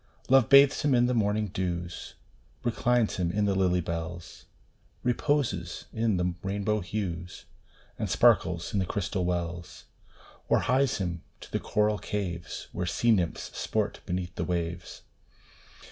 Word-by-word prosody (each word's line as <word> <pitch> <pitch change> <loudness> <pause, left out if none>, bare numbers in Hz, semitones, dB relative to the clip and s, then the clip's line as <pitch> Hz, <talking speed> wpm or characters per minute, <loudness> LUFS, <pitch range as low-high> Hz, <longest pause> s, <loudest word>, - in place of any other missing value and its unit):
Love 130 -3 +5
bathes 140 0 +7
him 145 -3 +3
in 120 0 +4
the 125 - +1
morning 105 -2 +1
dews, 85 -1 -4 0.5
Reclines 120 -1 +1
him 85 -2 0
in 105 +2 +1
the 100 - +2
lily 90 -2 +2
bells, 85 +1 -6 0.6
Reposes 120 - 0
in 110 -3 +1
the 90 0 0
rainbow 100 +2 -1
hues, 90 -3 -5 0.5
And - - -2
sparkles 85 -1 +3
in 100 - +2
the 95 - -1
crystal 95 -1 -2
wells, 85 -1 -4 0.6
Or - - +4
hies 135 +1 +2
him 85 -3 -3 0.2
to - - -12
the - - 0
coral 105 0 +1
caves, 90 -5 -4
Where 90 0 -3
sea 115 +6 +2
nymphs 90 -7 0
sport - - -1
beneath 90 0 -3
the - - -3
waves. 85 -1 -4
95 Hz, 145 wpm, -28 LUFS, 85-110 Hz, 0.6 s, bathes